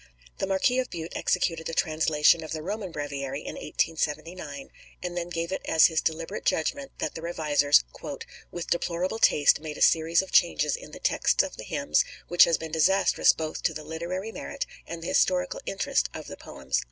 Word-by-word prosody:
The -, -, -1 dB
Marquis 195 Hz, +7 st, +2 dB
of 255 Hz, -, -2 dB
Bute 165 Hz, 0 st, -6 dB
executed 165 Hz, -1 st, 0 dB
a 165 Hz, -, -5 dB
translation 155 Hz, 0 st, +3 dB
of 155 Hz, -, -6 dB
the 155 Hz, -1 st, -4 dB
Roman 200 Hz, 0 st, -4 dB
Breviary 140 Hz, -2 st, -4 dB
in -, -, -6 dB
1879, 155 Hz, -1 st, -3 dB, 0.3 s
and 175 Hz, -1 st, -4 dB
then 175 Hz, 0 st, -3 dB
gave 170 Hz, 0 st, -3 dB
it 190 Hz, -, -2 dB
as 160 Hz, -1 st, +6 dB
his 160 Hz, -3 st, +2 dB
deliberate 165 Hz, +1 st, -3 dB
judgment 275 Hz, -, -1 dB
that -, -, -3 dB
the 160 Hz, -, -7 dB
revisers, 150 Hz, -, +3 dB, 0.7 s
"with 175 Hz, -1 st, -6 dB
deplorable 175 Hz, +4 st, -1 dB
taste 145 Hz, -9 st, +5 dB
made 150 Hz, -1 st, -7 dB
a -, -, -9 dB
series 165 Hz, +2 st, +4 dB
of 190 Hz, -, -11 dB
changes 155 Hz, -5 st, +3 dB
in -, -, -10 dB
the -, -, -10 dB
texts -, -, +2 dB
of -, -, -6 dB
the -, -, -8 dB
hymns 75 Hz, -, +1 dB, 0.3 s
which 175 Hz, +1 st, +7 dB
has 170 Hz, -, +2 dB
been 160 Hz, -1 st, -7 dB
disastrous 185 Hz, +5 st, +4 dB
both 155 Hz, -1 st, -5 dB
to 160 Hz, -, 0 dB
the 155 Hz, -, -6 dB
literary 170 Hz, +7 st, -4 dB
merit 280 Hz, +4 st, -5 dB, 0.2 s
and 165 Hz, 0 st, -6 dB
the -, -, -4 dB
historical 180 Hz, 0 st, +1 dB
interest 195 Hz, -, 0 dB
of -, -, -7 dB
the -, -, -8 dB
poems." -, -, -3 dB
165 Hz, 190 wpm, -27 LUFS, 155-180 Hz, 0.7 s, which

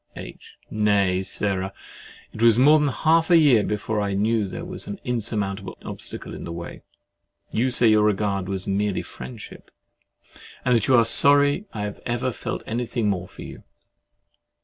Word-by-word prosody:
H. -, -, -12 dB
Nay, 100 Hz, -3 st, +1 dB
Sarah, 95 Hz, 0 st, -2 dB, 0.6 s
it 110 Hz, -, -8 dB
was 115 Hz, -1 st, +5 dB
more 150 Hz, +5 st, +5 dB
than 150 Hz, -, +1 dB
half 160 Hz, +4 st, +1 dB
a 175 Hz, -, +6 dB
year 140 Hz, -9 st, +4 dB
before 105 Hz, +1 st, -3 dB
I 100 Hz, -1 st, -2 dB
knew 110 Hz, +1 st, 0 dB
that -, -, -7 dB
there 170 Hz, -, -7 dB
was 180 Hz, 0 st, -5 dB
an 205 Hz, -, -7 dB
insurmountable 105 Hz, -5 st, -3 dB
obstacle -, -, -6 dB
in -, -, -8 dB
the 85 Hz, -, -7 dB
way. 85 Hz, 0 st, -8 dB, 0.7 s
You 125 Hz, +4 st, 0 dB
say 120 Hz, -2 st, +6 dB
your 110 Hz, -1 st, +4 dB
regard 100 Hz, -2 st, -1 dB
is 95 Hz, -1 st, -4 dB
merely 100 Hz, 0 st, -2 dB
friendship, 65 Hz, 0 st, -11 dB, 1.0 s
and 125 Hz, -1 st, +3 dB
that 115 Hz, -, 0 dB
you 130 Hz, -, +4 dB
are 115 Hz, -1 st, +4 dB
sorry 145 Hz, -, +5 dB
I 105 Hz, -, -6 dB
have 105 Hz, -1 st, -6 dB
ever 120 Hz, +2 st, -2 dB
felt -, -, -6 dB
anything 115 Hz, -1 st, -2 dB
more 90 Hz, -2 st, -4 dB
for -, -, -12 dB
you. -, -, -11 dB
110 Hz, 170 wpm, -23 LUFS, 100-125 Hz, 1.0 s, a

